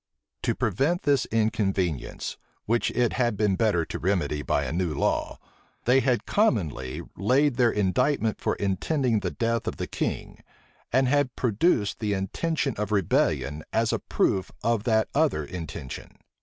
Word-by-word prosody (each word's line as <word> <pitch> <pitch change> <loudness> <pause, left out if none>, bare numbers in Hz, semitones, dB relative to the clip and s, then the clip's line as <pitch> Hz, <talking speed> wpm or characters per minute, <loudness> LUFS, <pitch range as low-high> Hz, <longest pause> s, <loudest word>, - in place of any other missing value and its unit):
To - - 0
prevent 165 +7 0
this 140 -3 +2
inconvenience, 95 - -1 0.3
which 115 +2 +1
it 120 -2 +1
had 120 -5 0
been 105 -2 +2
better 95 -5 +2
to - - -5
remedy 80 -6 0
by - - 0
a - - -3
new 85 -3 -1
law, - - 0 0.5
they 125 +2 +5
had 130 -2 +1
commonly 85 - 0
laid 130 +7 +2
their 120 -2 +4
indictment 110 +4 +1
for - - 0
intending 110 - 0
the 90 -3 -2
death 115 +8 -1
of - - -3
the - - -2
king - - -4 0.5
and 130 +1 +3
had 145 -1 +1
produced 115 - +1
the 105 -2 0
intention 135 - -1
of 105 0 -2
rebellion 80 -6 +1
as 115 0 +1
a - - 0
proof 95 -1 0
of 115 -1 +1
that 110 -2 +3
other 140 - +2
intention. 80 -5 -7
110 Hz, 155 wpm, -26 LUFS, 95-125 Hz, 0.5 s, they